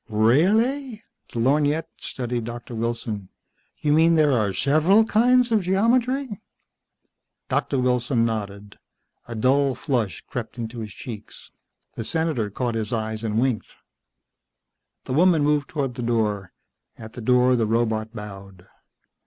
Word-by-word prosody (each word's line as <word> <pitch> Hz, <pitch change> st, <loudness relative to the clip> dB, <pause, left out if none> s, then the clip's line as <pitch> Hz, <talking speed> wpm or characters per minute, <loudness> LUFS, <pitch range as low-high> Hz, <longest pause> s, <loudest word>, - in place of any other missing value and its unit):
"REAHLLY!" 215 Hz, -, +2 dB, 0.3 s
The -, -, -7 dB
lorgnette 145 Hz, +5 st, +1 dB
studied 120 Hz, -2 st, -4 dB
Doctor 120 Hz, +1 st, -7 dB
Wilson. 115 Hz, -4 st, -3 dB, 0.5 s
"You 150 Hz, -1 st, +2 dB
mean 165 Hz, +2 st, +5 dB
there 155 Hz, -2 st, +4 dB
are 110 Hz, -6 st, +1 dB
several 155 Hz, -, +3 dB
kinds 245 Hz, +3 st, +3 dB
of 220 Hz, -2 st, +3 dB
geometry?" 235 Hz, +5 st, +1 dB, 1.1 s
Doctor 140 Hz, -, 0 dB
Wilson 125 Hz, -1 st, +1 dB
nodded. 100 Hz, -2 st, -5 dB, 0.5 s
A 120 Hz, -, -6 dB
dull 135 Hz, +4 st, +2 dB
flush 120 Hz, -6 st, -2 dB
crept 120 Hz, 0 st, -7 dB
into 115 Hz, 0 st, -5 dB
his 110 Hz, -2 st, -6 dB
cheeks. 110 Hz, 0 st, -10 dB, 0.4 s
The 115 Hz, -, -5 dB
Senator 155 Hz, -6 st, -1 dB
caught 120 Hz, +3 st, -2 dB
his 110 Hz, 0 st, -3 dB
eyes 110 Hz, -1 st, -3 dB
and 110 Hz, 0 st, 0 dB
winked. 125 Hz, -3 st, 0 dB, 1.3 s
The -, -, -4 dB
woman 165 Hz, 0 st, +4 dB
moved 145 Hz, -1 st, +1 dB
toward 140 Hz, -5 st, -2 dB
the 125 Hz, -, -6 dB
door. 105 Hz, -5 st, -1 dB, 0.5 s
At 110 Hz, 0 st, -10 dB
the 125 Hz, -, -8 dB
door 125 Hz, +2 st, +4 dB
the 115 Hz, -3 st, +1 dB
robot 110 Hz, -1 st, 0 dB
bowed. 100 Hz, -4 st, -10 dB
125 Hz, 135 wpm, -23 LUFS, 110-155 Hz, 1.3 s, mean